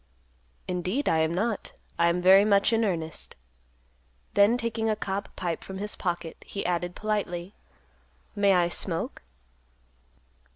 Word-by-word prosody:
"Indeed, 185 Hz, +10 st, -1 dB
I 160 Hz, -, +3 dB
am 160 Hz, 0 st, +2 dB
not; 210 Hz, +5 st, -2 dB, 0.3 s
I 170 Hz, -, +5 dB
am 175 Hz, +1 st, 0 dB
very 190 Hz, +2 st, +8 dB
much 200 Hz, +1 st, +3 dB
in 225 Hz, 0 st, +3 dB
earnest." 165 Hz, -6 st, -3 dB, 1.0 s
Then, 205 Hz, +4 st, +5 dB
taking 230 Hz, -2 st, -1 dB
a 215 Hz, -, +2 dB
cob 200 Hz, -1 st, -3 dB
pipe 170 Hz, -3 st, -3 dB
from 190 Hz, -, -7 dB
his 210 Hz, +2 st, -2 dB
pocket, 175 Hz, -3 st, -3 dB
he 200 Hz, -, -5 dB
added, 175 Hz, 0 st, -1 dB
politely, 200 Hz, -4 st, -2 dB, 0.8 s
"May 200 Hz, -1 st, +4 dB
I 175 Hz, -2 st, +4 dB
smoke?" 170 Hz, -1 st, -3 dB
190 Hz, 135 wpm, -27 LUFS, 175-210 Hz, 1.0 s, very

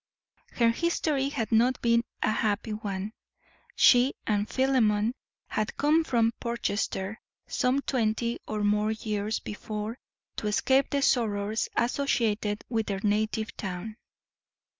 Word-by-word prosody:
Her 235 Hz, -1 st, +3 dB
history 295 Hz, -1 st, 0 dB
had 225 Hz, -6 st, -3 dB
not 240 Hz, +3 st, +3 dB
been 235 Hz, 0 st, +3 dB, 0.2 s
a -, -, +2 dB
happy 215 Hz, 0 st, 0 dB
one. 205 Hz, -1 st, -4 dB, 0.6 s
She 250 Hz, +2 st, +5 dB
and 210 Hz, -1 st, 0 dB
Philemon 235 Hz, -5 st, +2 dB, 0.3 s
had 215 Hz, -, -3 dB
come 305 Hz, +3 st, +3 dB
from 230 Hz, -5 st, +2 dB
Portchester 220 Hz, -3 st, -2 dB, 0.2 s
some 265 Hz, +3 st, 0 dB
twenty 235 Hz, -1 st, 0 dB
or 215 Hz, -1 st, -2 dB
more 210 Hz, +1 st, +2 dB
years 215 Hz, 0 st, -2 dB
before 215 Hz, +2 st, -5 dB, 0.4 s
to 210 Hz, -, -2 dB
escape 265 Hz, +6 st, +2 dB
the 280 Hz, -1 st, 0 dB
sorrows 215 Hz, -4 st, +1 dB
associated 225 Hz, -5 st, 0 dB
with 225 Hz, -3 st, -1 dB
their 195 Hz, -1 st, -2 dB
native 215 Hz, +1 st, 0 dB
town. 195 Hz, +2 st, -5 dB
220 Hz, 120 wpm, -28 LUFS, 210-245 Hz, 0.6 s, She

